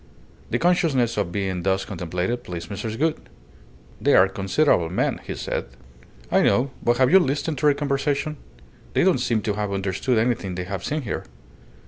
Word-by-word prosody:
The 120 Hz, -, +1 dB
consciousness 150 Hz, -8 st, +2 dB
of 100 Hz, -5 st, -1 dB
being 95 Hz, -2 st, -2 dB
thus 95 Hz, +1 st, 0 dB
contemplated 90 Hz, +6 st, -3 dB
pleased 85 Hz, 0 st, -7 dB
Mrs. 110 Hz, +2 st, -4 dB
Gould. 160 Hz, +3 st, +1 dB, 0.8 s
"They -, -, +4 dB
are 95 Hz, -, +7 dB
considerable 95 Hz, -, +1 dB
men," 90 Hz, -, -1 dB
he -, -, -5 dB
said. -, -, -3 dB, 0.7 s
"I -, -, +4 dB
know. 125 Hz, +7 st, +2 dB
But 120 Hz, 0 st, +2 dB
have 130 Hz, 0 st, +4 dB
you 190 Hz, -, +8 dB
listened 150 Hz, -2 st, -1 dB
to 150 Hz, -, +3 dB
their 145 Hz, -, +5 dB
conversation? 145 Hz, +1 st, -1 dB, 0.6 s
They -, -, +4 dB
don't 180 Hz, -7 st, +3 dB
seem 115 Hz, -3 st, 0 dB
to 105 Hz, -, 0 dB
have 105 Hz, -1 st, -2 dB
understood 100 Hz, +5 st, 0 dB
anything 110 Hz, -5 st, 0 dB
they 90 Hz, -, -3 dB
have 95 Hz, -1 st, -5 dB
seen 150 Hz, 0 st, -2 dB
here." 105 Hz, -, -4 dB
115 Hz, 175 wpm, -23 LUFS, 95-140 Hz, 0.8 s, you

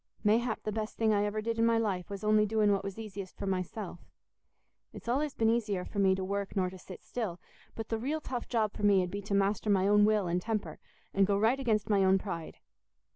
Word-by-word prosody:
Mayhap 220 Hz, +2 st, +2 dB
the 215 Hz, -, -2 dB
best 215 Hz, 0 st, -4 dB
thing 220 Hz, -1 st, +3 dB
I 205 Hz, 0 st, +2 dB
ever 215 Hz, +1 st, -2 dB
did 230 Hz, 0 st, -2 dB
in 230 Hz, -, +4 dB
my 230 Hz, 0 st, +3 dB
life 195 Hz, -6 st, -1 dB
was 200 Hz, 0 st, -6 dB
only 215 Hz, 0 st, +4 dB
doing 215 Hz, -1 st, +3 dB
what 200 Hz, -1 st, +1 dB
was 195 Hz, 0 st, -5 dB
easiest 200 Hz, -4 st, -7 dB
for -, -, -4 dB
myself. 185 Hz, 0 st, -3 dB, 0.9 s
It's -, -, -11 dB
allays 280 Hz, +4 st, 0 dB
been 225 Hz, -, +2 dB
easier 210 Hz, -6 st, -1 dB
for 200 Hz, -, -5 dB
me 190 Hz, -1 st, +4 dB
to 190 Hz, -, -3 dB
work 200 Hz, +1 st, -3 dB
nor 185 Hz, -2 st, +1 dB
to 190 Hz, -, -10 dB
sit 185 Hz, 0 st, -11 dB
still, 205 Hz, -8 st, -4 dB, 0.4 s
but 225 Hz, -1 st, -6 dB
the 225 Hz, -, -1 dB
real 290 Hz, +7 st, -1 dB
tough 250 Hz, -5 st, -5 dB
job 220 Hz, -4 st, +1 dB
for -, -, -8 dB
me 200 Hz, -2 st, +4 dB
'ud 180 Hz, -, -4 dB
be 200 Hz, -, -4 dB
to 200 Hz, 0 st, -2 dB
master 200 Hz, +2 st, +1 dB
my 195 Hz, -1 st, +3 dB
own 210 Hz, 0 st, +5 dB
will 210 Hz, -2 st, +3 dB
and 175 Hz, +1 st, 0 dB
temper 220 Hz, 0 st, -3 dB, 0.3 s
and 195 Hz, -1 st, +3 dB
go 200 Hz, -1 st, +2 dB
right 225 Hz, +6 st, +2 dB
against 220 Hz, -6 st, +1 dB
my 200 Hz, -2 st, +3 dB
own 190 Hz, 0 st, +5 dB
pride. 170 Hz, -4 st, -6 dB
205 Hz, 240 wpm, -31 LUFS, 195-220 Hz, 0.9 s, own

